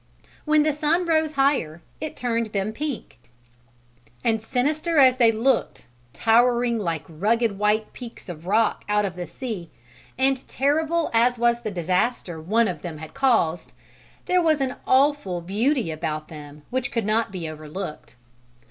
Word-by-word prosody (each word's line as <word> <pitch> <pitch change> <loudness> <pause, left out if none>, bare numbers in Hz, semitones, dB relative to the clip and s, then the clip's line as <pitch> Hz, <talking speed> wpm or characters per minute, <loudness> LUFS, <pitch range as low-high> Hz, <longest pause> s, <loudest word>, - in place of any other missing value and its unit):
When 305 -1 +4
the 305 -1 +1
sun 310 +4 +1
rose 315 -2 +1
higher, 270 - +1 0.2
it 310 0 -5
turned 230 -2 -1
them 200 +2 -1
pink, 290 0 -5 1.0
and 225 -1 +1
sinister 300 +8 0
as 260 -2 +6
they 235 -3 +5
looked 230 +3 0 0.3
towering 235 - +3
like 165 -6 -2
rugged 205 +5 0
white 210 +1 +1
peaks 240 -3 -10
of 170 -1 -8
rock 220 +3 +2
out 210 0 +2
of 185 -3 -4
the 175 -1 -5
sea, 205 - -6 0.5
and 265 0 +1
terrible 315 +4 0
as 240 +2 +3
was 235 0 +2
the 215 - -3
disaster 180 -1 -1
one 220 +7 +2
of 175 -5 -4
them 165 -3 -6
had 160 +1 -10
caused, 175 -11 +1 0.5
there 360 0 +3
was 315 -3 +3
an 265 -2 -1
awful 265 -9 +2
beauty 215 - 0
about 155 0 -4
them 150 -1 -11
which 250 -1 -1
could 230 -3 -1
not 220 0 +1
be 180 -4 -5
overlooked. 155 +1 -7
230 Hz, 155 wpm, -24 LUFS, 180-270 Hz, 1.0 s, as